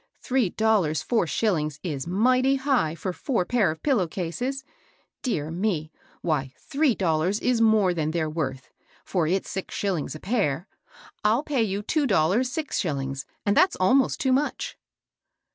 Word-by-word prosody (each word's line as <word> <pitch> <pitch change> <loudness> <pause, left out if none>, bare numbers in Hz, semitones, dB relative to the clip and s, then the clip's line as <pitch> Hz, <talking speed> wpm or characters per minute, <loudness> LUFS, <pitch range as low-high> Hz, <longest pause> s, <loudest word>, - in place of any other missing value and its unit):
Three 255 -6 +1
dollars 200 -8 +1
four 225 -8 +1
shOlings 155 -8 0
is 150 -4 -3
mighty 255 +8 +3
high 265 - +1
for 180 +3 -4
four 230 -3 -1
pair 225 -6 +2
of 160 0 -6
pillow 245 - +2
cases 245 - -3
I - - -33 0.5
Dear 160 - -2
me! 170 -4 -1 0.3
why, 135 -5 -1
three 285 -4 +1
dollars 175 +3 +1
is 250 -2 +1
more 215 -5 +4
than 155 -3 -1
they're 160 -1 -1
worth; 140 -4 -4 0.3
for 175 -5 0
it*s 185 +3 0
six 190 - -5
shillings 185 -7 -2
a - - -7
pair. 190 - -1 0.6
I'll 220 +6 +3
pay 285 -5 0
you 205 -1 -1
two 295 +5 +1
dollars 200 +6 +2
six 305 +1 -2
shillings; 135 -6 -3 0.2
and 205 0 +2
that's 370 - +4
almost 255 +9 +3
too 260 -1 +2
much." 285 +3 -1
195 Hz, 160 wpm, -25 LUFS, 160-250 Hz, 0.6 s, more